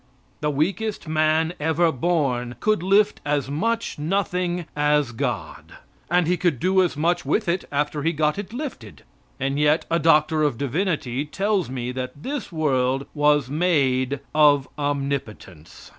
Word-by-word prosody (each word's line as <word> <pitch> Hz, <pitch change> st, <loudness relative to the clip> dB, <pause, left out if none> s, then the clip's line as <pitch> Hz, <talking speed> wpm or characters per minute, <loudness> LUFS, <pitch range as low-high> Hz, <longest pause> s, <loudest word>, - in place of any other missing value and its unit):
The 150 Hz, -, 0 dB
weakest 190 Hz, +7 st, -1 dB
man 155 Hz, +1 st, +1 dB
ever 160 Hz, +2 st, +2 dB
born 130 Hz, -5 st, -1 dB
could 215 Hz, -5 st, +1 dB
lift 200 Hz, +3 st, +3 dB
as 145 Hz, -2 st, -1 dB
much 230 Hz, +5 st, -1 dB
nothing 180 Hz, +1 st, -1 dB
as 150 Hz, -3 st, +2 dB
God. 115 Hz, -, -4 dB, 0.4 s
And 175 Hz, 0 st, +3 dB
he 180 Hz, +2 st, +1 dB
could 170 Hz, -7 st, 0 dB
do 190 Hz, +1 st, +3 dB
as 175 Hz, -5 st, 0 dB
much 175 Hz, +3 st, +1 dB
with 215 Hz, -, 0 dB
it 175 Hz, +2 st, 0 dB
after 145 Hz, +1 st, -1 dB
he 165 Hz, +3 st, +1 dB
got 150 Hz, +2 st, 0 dB
it 205 Hz, 0 st, -6 dB
lifted. 240 Hz, -, -7 dB, 0.4 s
And 135 Hz, +2 st, -1 dB
yet 150 Hz, +2 st, +3 dB
a 170 Hz, -, +3 dB
doctor 155 Hz, -1 st, +3 dB
of 145 Hz, -6 st, +1 dB
divinity 140 Hz, -, -1 dB
tells 195 Hz, +2 st, -1 dB
me 125 Hz, -1 st, -4 dB
that 130 Hz, +3 st, -6 dB
this 275 Hz, -7 st, -4 dB
world 135 Hz, -4 st, 0 dB
was 145 Hz, -2 st, +3 dB
made 140 Hz, -5 st, +1 dB
of 145 Hz, -3 st, +4 dB
omnipotence. 140 Hz, -, -4 dB
150 Hz, 150 wpm, -23 LUFS, 140-175 Hz, 0.4 s, of